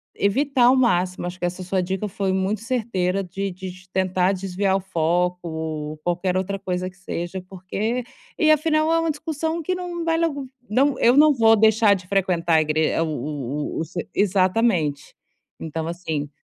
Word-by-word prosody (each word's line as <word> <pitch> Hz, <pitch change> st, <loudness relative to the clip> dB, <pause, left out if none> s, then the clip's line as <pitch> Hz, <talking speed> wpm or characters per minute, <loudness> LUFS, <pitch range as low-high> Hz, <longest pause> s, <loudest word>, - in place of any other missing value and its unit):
evitar 265 Hz, +5 st, +1 dB
ao 250 Hz, +2 st, +6 dB
máximo, 185 Hz, -8 st, +1 dB
acho 180 Hz, -, -6 dB
que 175 Hz, -, -1 dB
essa 180 Hz, +1 st, -3 dB
sua 185 Hz, +1 st, 0 dB
dica 190 Hz, +3 st, -2 dB
foi 195 Hz, -1 st, -2 dB
muito 190 Hz, +2 st, -1 dB
certeira 195 Hz, -6 st, -1 dB
de 195 Hz, +2 st, -4 dB
de 185 Hz, +1 st, -7 dB
de 185 Hz, 0 st, -13 dB
tentar 185 Hz, 0 st, +1 dB
desviar 190 Hz, +1 st, -1 dB
o -, -, +2 dB
foco, 180 Hz, 0 st, 0 dB
ou 155 Hz, -1 st, -4 dB
qualquer 175 Hz, +2 st, -1 dB
outra 190 Hz, +1 st, -1 dB
coisa 185 Hz, -1 st, -3 dB
que 185 Hz, -, -21 dB
seja, 190 Hz, -1 st, -5 dB
porque 205 Hz, +6 st, -3 dB, 0.3 s
e 310 Hz, -, +3 dB
afinal 310 Hz, +1 st, +2 dB
é 330 Hz, -, +3 dB
uma 330 Hz, -1 st, +1 dB
discussão 320 Hz, +2 st, -3 dB
que 365 Hz, +4 st, -1 dB
não 350 Hz, -2 st, -4 dB
vai 330 Hz, 0 st, +1 dB
logo 285 Hz, -6 st, -1 dB, 0.2 s
não, 275 Hz, +6 st, +2 dB
eu 240 Hz, +2 st, +5 dB
não 300 Hz, +1 st, +7 dB
vou 225 Hz, -3 st, +5 dB
deixar 220 Hz, 0 st, +5 dB
de 185 Hz, -1 st, -9 dB
frequentar 180 Hz, -4 st, +1 dB
a 160 Hz, -, +5 dB
igre 155 Hz, +1 st, +1 dB
o 165 Hz, -, +2 dB
o 145 Hz, -2 st, -4 dB
o -, -, -1 dB
o 165 Hz, -, -2 dB
se 175 Hz, +2 st, -6 dB
exatamente. 185 Hz, -6 st, +1 dB, 0.5 s
Então 160 Hz, 0 st, -4 dB
assim 160 Hz, -4 st, -3 dB
190 Hz, 185 wpm, -23 LUFS, 175-235 Hz, 0.5 s, não